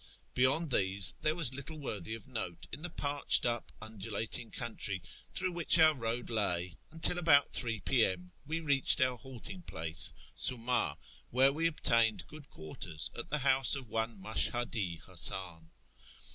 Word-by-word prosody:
Beyond 135 +5 +1
tliese 95 -4 +3
there 155 +1 +1
was 155 -7 +3
little 140 +4 -6
worthy 110 - -5
of 115 - -13
note 110 -9 -6
in 140 - -6
the 175 - -5
parched 145 -3 +3
up 120 -1 -2
undulating 110 +1 -5
country 105 -5 -2 0.3
through 185 0 +1
which 170 -1 +2
our 160 -1 +6
road 120 -2 -4
lav, 90 -5 -1 0.2
until, 165 +2 +1
about 145 -5 +4 0.2
?> 110 -3 -5
P.M., 95 -8 +1 0.2
we 160 +2 -2
reached 140 -4 +4
our 130 -1 +2
halting 130 - -9
place, 80 - +1 0.2
Suma, 125 -1 0 0.3
wdiere 135 +3 +4
we 165 +3 +1
obtained 115 - +1
good 150 -1 -13
quarters 80 +1 -5
at 120 - -6
the 150 - 0
house 135 -2 +5
of 130 -5 -8
one 115 -2 -3
Mashhadi 110 -3 -1
Hasan. 85 -3 -2
120 Hz, 150 wpm, -32 LUFS, 100-145 Hz, 0.3 s, our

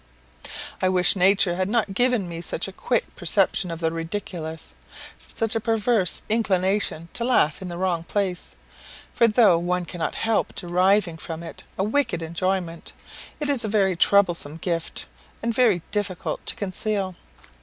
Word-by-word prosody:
I 185 - +3
wish 180 +1 +4
nature 190 -1 +3
had 185 +1 -1
not 220 -3 0
given 245 -3 +1
me 170 -1 -6
such 170 +1 -3
a 195 - -9
quick - - -1
perception 180 - +2
of 165 -1 -5
the 160 0 +1
ridiculous 165 -1 -5 0.6
such 225 -1 0
a - - +2
perverse 220 -4 +1
inclination 190 -5 +1
to 235 - -1
laugh 235 - +2
in 185 - -6
the 175 -1 -6
wrong 175 -2 -1
place; 190 -2 -2 0.6
for 235 - +4
though 215 -6 +4
one 180 +1 -1
cannot 170 -1 -4
help 225 -1 0
deriving 180 -1 +1
from 165 0 -7
it 165 - -9
a 190 - 0
wicked 215 -6 0
enjoyment, 170 0 -3 0.5
it 295 - -1
is 280 -4 +5
a - - -1
very 200 -3 +2
troublesome 175 -5 +2
gift, 165 -1 0 0.4
and 230 0 0
very 220 -8 +3
difficult 200 -4 -3
to - - +4
conceal. 200 -1 -2
185 Hz, 155 wpm, -24 LUFS, 170-210 Hz, 0.6 s, is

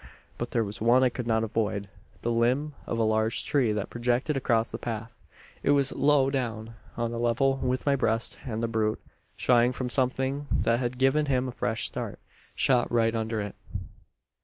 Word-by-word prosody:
"But 120 - -3
there 115 - +1
was 105 0 -7
one 120 +3 +5
I 130 - +5
could 120 0 -5
not 110 -1 +2
avoid 105 -2 -1 0.4
the 120 - 0
limb 125 +6 +1
of 115 - -2
a 115 - +2
large 110 +1 +1
tree 130 -6 +2
that 105 -1 -3
projected 120 +5 0
across 115 -3 +1
the - - -5
path. 115 0 -5 0.5
It - - -1
was 140 -2 +3
low 140 -2 +3
down 115 -4 -3 0.2
on 115 0 -1
a 115 - -3
level 125 +3 +2
with 130 0 -1
my 140 -1 +3
breast 115 -3 0
and 115 -2 -3
the - - +1
brute, 110 -1 0 0.4
shying 120 0 +3
from 125 -1 -3
something 135 +2 0
that 115 +1 +2
had 125 0 -2
given 135 +3 +3
him 130 -1 +1
a - - -4
fresh - - -2
start, - - -4 0.4
shot 125 -2 +2
right 115 -1 +2
under 110 -1 -1
it. 100 -1 -5
120 Hz, 190 wpm, -27 LUFS, 115-130 Hz, 0.5 s, one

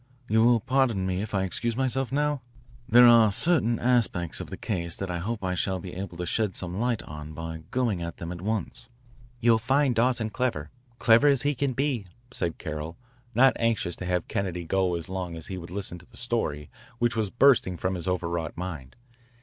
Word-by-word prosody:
You 110 +1 +3
will 120 0 +5
pardon 125 -6 +1
me 95 0 -1
if 105 -1 -4
I 95 - +1
excuse 115 +5 -2
myself 135 0 -1
now? 145 0 0 0.5
There 120 +1 +8
are 115 -3 +7
certain 120 - +2
aspects 115 -9 +1
of - - -6
the - - -6
case 85 -5 -2
that 95 -2 -4
I 85 - -2
hope 110 +4 -4
I 90 -1 0
shall 95 +1 -1
be 90 0 -8
able 95 -2 -6
to 90 - -3
shed 105 +2 0
some 90 +1 -5
light 120 -1 0
on 75 0 -8
by 80 0 -7
going 120 -8 0
at 85 0 -5
them 85 0 -6
at 85 -1 -7
once." 110 +3 -3 0.5
"You'll 115 -1 +5
find 135 +3 +2
Dawson 115 -1 +1
clever, 110 - -2 0.3
clever 115 +5 +5
as 140 -3 +3
he 145 +1 +2
can 140 0 -1
be," 130 -6 -1 0.2
said 85 -9 -2
Carroll, 75 +2 -5 0.4
not 130 +3 +6
anxious 115 -7 0
to 90 - -6
have 90 -1 -1
Kennedy 90 -3 -3
go 95 +1 +1
as 85 -2 -5
long 90 -2 -4
as 80 - -7
he - - -4
would 85 - -9
listen 95 -1 -5
to 90 - -18
the - - -15
story 110 -12 -2 0.3
which 120 0 +1
was 110 -3 0
bursting 120 -7 +4
from 95 +3 -1
his 90 -1 -4
overwrought 85 -3 -2
mind. 80 -8 -6
100 Hz, 205 wpm, -27 LUFS, 85-120 Hz, 0.5 s, There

